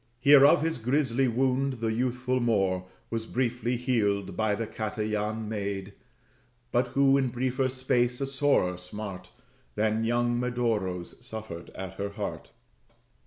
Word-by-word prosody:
Here 140 +2 +7
of 145 - +4
his 165 -4 -1
grisly 130 +1 +1
wound 130 +3 +1
the 115 -2 -2
youthful 125 +2 0
Moor 95 -6 +1 0.3
Was 115 -1 -3
briefly 120 -1 -1
healed 100 -6 0
by 110 +1 +1
the 115 +2 -3
Catayan 110 0 -3
maid; 100 -2 -4 0.8
But 120 +1 +2
who 140 0 +5
in 135 - +1
briefer 130 +2 0
space, 125 -1 0
a 135 - 0
sorer 135 -10 +1
smart 90 0 -7 0.5
Than 110 +1 +1
young 120 +1 +1
Medoro's, 115 -6 -2
suffered 110 -8 -7
at 95 0 -7
her 100 0 -1
heart. 100 0 -5
115 Hz, 135 wpm, -28 LUFS, 105-125 Hz, 0.8 s, Here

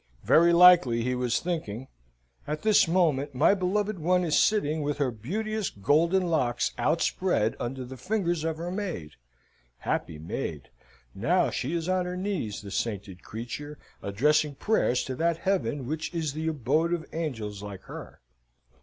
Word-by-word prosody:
Very 170 +1 +5
likely 170 -10 +6
he 125 +1 0
was 125 -1 0
thinking; 135 -9 -4 0.6
"At 150 +1 -3
this 215 -4 +5
moment, 155 -6 +1
my 150 +9 +5
beloved 200 +1 -1
one 180 +3 +2
is 160 -3 +1
sitting 160 -8 +2
with 145 0 -2
her 140 -3 +1
beauteous 210 - -3
golden 165 - +2
locks 150 -8 +1
outspread 160 - +1
under 130 +1 -4
the 130 +1 -9
fingers 175 - -1
of 160 -1 -2
her 170 +2 -4
maid. 180 - -4 0.7
Happy 75 +4 -3
maid! 75 -2 -5 0.4
Now - - +1
she 145 +7 -2
is 165 0 -2
on 185 -1 +1
her 180 0 -4
knees, 180 - -3
the 100 - -8
sainted 100 -4 -3
creature, 135 +7 -7 0.2
addressing 145 +8 +1
prayers 135 - +1
to 130 - -4
that 165 +1 +1
Heaven 170 -7 -1
which 155 +4 -3
is 155 -4 -1
the 160 +2 -3
abode 155 +3 +1
of 165 -2 -2
angels 115 -11 -4
like 100 -2 -8
her. - - -10
155 Hz, 155 wpm, -27 LUFS, 125-180 Hz, 0.7 s, likely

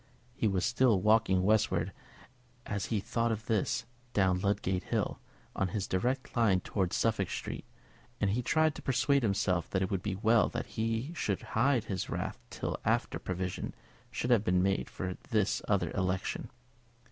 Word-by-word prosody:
He 120 -3 0
was 95 -3 +1
still 125 -4 +3
walking 105 -2 +3
westward 100 -4 +2 0.7
as 100 -2 -2
he 110 - 0
thought 115 +2 0
of 110 0 -3
this, 110 +1 0 0.3
down 95 -2 +3
Ludgate 95 -1 0
Hill, - - -1 0.4
on 95 - +1
his 95 +2 -2
direct 125 +8 -1
line 110 -6 +4
towards 95 -2 -1
Suffolk 110 -5 +1
Street; - - -5 0.5
and 100 -2 +2
he 120 +5 +1
tried 155 +5 +3
to - - -9
persuade 135 +2 +2
himself 100 -5 +1
that 95 -1 0
it 95 - -2
would 95 -2 0
be 95 -1 -2
well 110 +2 +4
that - - -3
he 115 +7 -2
should 105 - -2
hide 125 +1 +3
his 95 -3 -3
wrath - - -3
till - - -3
after - - +1
provision 90 0 -3 0.3
should 125 - -2
have 115 -4 +5
been 90 -3 +2
made 95 0 0
for 95 -1 -4
this 105 -3 +1
other 95 -5 +1
election. 95 -1 -1
105 Hz, 170 wpm, -31 LUFS, 95-115 Hz, 0.7 s, have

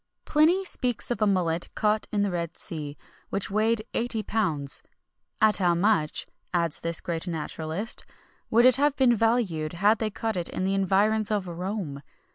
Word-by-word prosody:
Pliny 335 +6 +3
speaks 245 -8 -1
of 240 - -2
a 215 - +4
mullet 175 -4 0
caught 210 0 +1
in 205 -1 +1
the 200 - 0
red 170 -1 -3
sea, 150 -3 -4 0.3
which 195 0 -3
weighed 215 +1 +1
eighty 230 -2 -1
pounds.[XXI 160 -12 -1 0.6
53] - - +8
"At 210 - +1
how 175 -3 +2
much," 175 -4 +1 0.3
adds 170 -3 0
this 165 0 -2
great 170 +1 -2
naturalist, 165 +5 -2 0.5
"would 235 +2 +5
it 255 0 +6
have 290 0 +2
been 255 -4 +4
valued 210 -9 0
had 205 +5 +3
they 220 - 0
caught 220 0 -3
it 175 - -1
in - - -3
the 190 +1 +1
environs 200 +3 +2
of 205 -3 -1
Rome!" 175 -4 -4
200 Hz, 175 wpm, -26 LUFS, 170-225 Hz, 0.6 s, 53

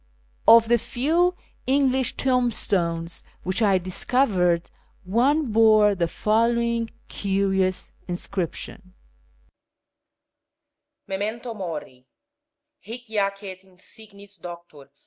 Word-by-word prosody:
Of 230 0 +8
the 240 0 +3
few 335 +11 +1 0.3
English 265 -2 +2
tombstones 190 -10 0 0.2
wliich 185 +5 -1
I 200 -3 +4
discovered, 185 -2 +1 0.3
one 250 - +1
bore 215 -1 +5
the 175 -3 0
following 230 +4 +1 0.2
curious 195 -1 -1 0.2
inscription: 185 +1 -5 1.2
— - - -60
MEMENTO 220 +5 -4
MORI 150 - -7 0.7
HIC 230 +5 -8
lACET 200 -2 -2
INSIGNIS 200 +2 -15
DOCTOR 170 -2 -10
R. - - -34
205 Hz, 90 wpm, -24 LUFS, 185-235 Hz, 1.2 s, Of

